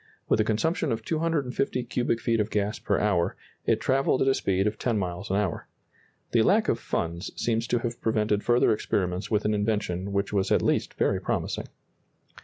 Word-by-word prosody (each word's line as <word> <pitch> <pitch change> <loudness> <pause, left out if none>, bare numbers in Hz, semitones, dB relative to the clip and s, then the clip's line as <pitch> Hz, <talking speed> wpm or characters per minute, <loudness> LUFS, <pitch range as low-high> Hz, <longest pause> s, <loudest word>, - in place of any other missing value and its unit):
With - - +2
a - - +5
consumption 135 +8 0
of 115 -1 -3
250 145 -6 -1
cubic 120 0 -1
feet 115 0 +1
of 105 0 0
gas 105 +1 -1
per - - 0
hour, 90 -5 +1 0.3
it - - +3
travelled 135 0 +2
at - - 0
a 135 - +5
speed 95 -5 0
of 105 0 -1
ten 120 -3 0
miles 90 0 -3
an 95 - +1
hour. 100 -4 -1 0.6
The 115 - +4
lack 215 - +3
of 115 - +1
funds 85 -3 -3
seems 115 0 0
to 120 - +1
have 120 0 -4
prevented 105 -2 +1
further 120 -1 +4
experiments 90 -3 -1
with 105 -2 +1
an 105 - +2
invention 105 -3 -1
which 100 +1 -1
was 100 -1 +1
at - - +3
least - - 0
very - - +1
promising. - - -2
110 Hz, 195 wpm, -27 LUFS, 100-120 Hz, 0.6 s, a